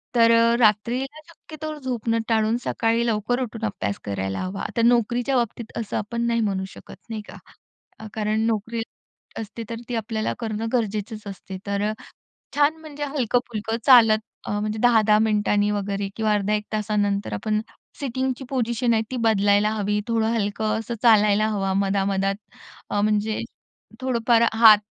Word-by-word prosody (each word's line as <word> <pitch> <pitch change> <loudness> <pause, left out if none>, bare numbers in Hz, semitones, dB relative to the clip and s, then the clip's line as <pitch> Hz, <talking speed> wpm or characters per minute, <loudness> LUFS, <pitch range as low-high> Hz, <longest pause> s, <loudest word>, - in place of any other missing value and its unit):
तर 230 -1 +6
अ, 230 0 +5
रात्रीला 245 +7 +1
शक्यतो 310 -2 -8
झोपन 240 -4 -2
टाळून 220 +1 +2
सकाळी 230 +1 +1
लवकर 230 +2 0
उठून 230 -2 -5
अभ्यास 185 - -3
करायला 95 -1 -3
हवा. 190 +2 -4
तर 230 - +3
नोकरीच्या 240 +2 +2
बाबतीत 235 -1 -2
असं 220 -3 -3
आपण 235 +3 -2
नाही 235 0 +1
म्हणू 195 -3 -1
शकत - - -12
नाही 220 -1 -4
का. - - -10 0.6
अ, 220 - -8
कारण 215 +1 0
नोकरी 225 +1 -1 0.6
असते, 225 +1 -6
तर 230 - -3
ती 245 - -2
आपल्याला 220 -1 -2
करणं 225 -1 -3
गरजेचंच 215 -2 -2
असते. 190 -1 -7
तर 200 0 -1
अ, 215 - -2 0.6
छान 295 +2 +3
म्हणजे 295 -2 -6
हलक-पुलकं 240 -5 -1
चालत 225 -5 +7 0.3
म्हणजे 210 +1 -2
अ, - - -5
10-10 220 -3 +5
मिनिटांनी 210 -1 +2
वगैरे 200 -1 -2
किंवा 215 -1 +1
अर्धा 205 0 +1
1 210 0 -1
तासानंतर 205 - 0
आपण 215 - -1 0.4
सिटिंगची 260 0 -2
पोझिशन 240 -2 0
आहे 220 - +2
ती 255 - -3
बदलायला 205 0 +3
हवी. 210 -1 -1
थोडं 225 -1 +1
हलकं 215 0 -1
असं 225 +1 -4
चालायला 215 -2 +5
हवं 195 -2 -1
मधा 195 0 +1
मधात. 195 0 0 0.6
अ, 205 - +1
म्हणजे 215 +1 +1 0.6
थोडंफार 235 -2 +2
हात 220 -2 +8
220 Hz, 155 wpm, -23 LUFS, 205-235 Hz, 0.6 s, हात